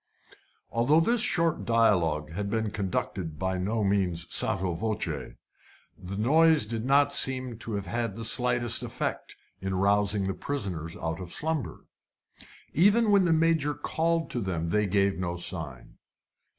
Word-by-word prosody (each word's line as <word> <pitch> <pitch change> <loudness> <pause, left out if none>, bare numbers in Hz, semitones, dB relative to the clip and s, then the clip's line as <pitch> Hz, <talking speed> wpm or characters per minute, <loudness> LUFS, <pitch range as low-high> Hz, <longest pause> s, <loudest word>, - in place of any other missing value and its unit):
Although 135 +8 +3
this 230 +6 +2
short 170 -9 +1
dialogue 85 -10 +2
had 100 +4 -4
been 110 0 -1
conducted 95 -5 -3
by 95 +2 -2
no 105 +4 -1
means 95 -4 0
sotto 95 -2 +1
voce, 110 +5 -2 0.9
the 95 +1 -8
noise 155 +4 +4
did 110 +1 -4
not 140 +2 +3
seem 130 -4 +1
to 115 - -5
have 100 -1 -4
had 115 -3 -3
the 115 0 -3
slightest 120 0 +2
effect - - -4 0.2
in 95 0 -3
rousing 100 +1 +2
the 95 - -1
prisoners 90 - -4
out 80 0 -4
of 90 -2 -8
slumber. 155 -4 -3 0.9
Even 210 +6 +4
when 200 -2 +5
the 170 - +2
Major 160 -2 +2
called 165 0 -1
to 120 - -2
them 85 -4 -2
they 105 +3 +1
gave 100 0 +1
no 90 -1 -2
sign. 80 -7 -5
105 Hz, 150 wpm, -27 LUFS, 95-140 Hz, 0.9 s, when